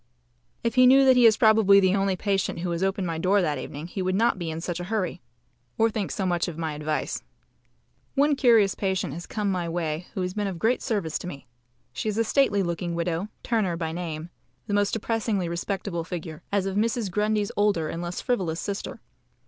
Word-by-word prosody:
If 230 - 0
he 255 -1 +6
knew 270 +1 +7
that 260 -1 +6
he 245 -2 +7
is 220 - +4
probably 215 -3 +6
the 190 0 +3
only 195 -1 +1
patient 195 -3 -1
who 175 0 -2
has 170 +1 -2
opened 195 0 0
my 165 -2 -3
door 190 +4 +3
that 150 -7 0
evening 145 +4 -7
he 185 +3 -5
would 185 0 0
not 225 -1 +2
be 170 -2 -3
in 160 0 -4
such 175 +1 -4
a 175 - -4
hurry 200 -3 -2 0.6
or 225 0 +3
think 210 -2 -2
so 195 - -2
much 175 -2 0
of 165 -3 -6
my 160 -2 -2
advice. 150 +1 -2 0.9
One 290 +1 +3
curious 230 -7 +4
patient 190 -7 -2
has 170 +3 -7
come 210 -2 -1
my 175 -2 -2
way 165 0 -3
who 190 - -1
has 180 0 -3
been 205 0 -1
of 190 -3 -4
great 225 +8 +1
service 200 - -1
to - - -7
me. 140 -5 -8 0.5
She 215 - -2
is 210 - -3
a 230 - +3
stately 220 -4 +2
looking 170 0 -3
widow, 170 +2 -1 0.2
Turner 205 -8 0
by 165 -1 -3
name, 165 -1 -5 0.3
the 205 - -4
most 205 0 +2
depressingly 220 -4 -1
respectable 170 0 -3
figure, 165 -2 -6
as 200 -2 +1
of 195 0 -2
Mrs. 220 -1 0
Grundy's 210 +1 0
older 205 -6 +2
and 165 - -4
less 175 0 -4
frivolous 180 -9 -1
sister. 200 0 -5
190 Hz, 215 wpm, -26 LUFS, 170-210 Hz, 0.9 s, knew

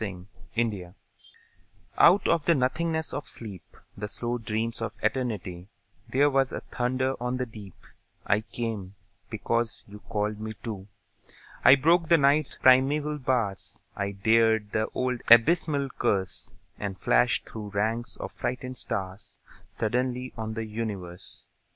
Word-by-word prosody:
The 90 -4 -5 0.3
Call 100 -6 -2 1.0
Out 190 +4 +6
of 165 -3 +2
the 170 - +4
nothingness 160 +4 0
of 145 - -4
sleep, 100 -6 -9 0.2
The 105 +1 -4
slow 120 +3 -2
dreams 115 +1 -2
of 115 -1 -3
Eternity, 105 -7 -2 0.4
There 140 +3 +4
was 135 -1 +2
a - - -4
thunder 130 +1 -1
on 125 +1 -1
the 125 - -1
deep: 105 -5 -11 0.5
I 105 +1 +2
came, 110 -4 -5 0.3
because 115 +1 -1
you 105 +1 -11
called 105 -1 -2 0.3
to 115 -3 -3
me. 95 - -14 0.8
I 130 - +9
broke 165 +4 +3
the 170 - +7
Night's 145 0 +3
primeval 145 +4 +4
bars, 120 -7 -1 0.2
I 100 0 -2
dared 110 +1 +3
the 110 0 0
old 125 -1 -1
abysmal 140 +4 +5
curse, 95 +2 -1 0.3
And 100 -2 -4
flashed - - +2
through 105 -2 -7
ranks 110 +4 -1
of - - -6
frightened 125 +1 -4
stars 95 -2 -5 0.3
Suddenly 125 +3 -2
on 110 -1 -4
the 110 0 -3
universe! 105 -5 -6
115 Hz, 140 wpm, -27 LUFS, 105-130 Hz, 1.0 s, I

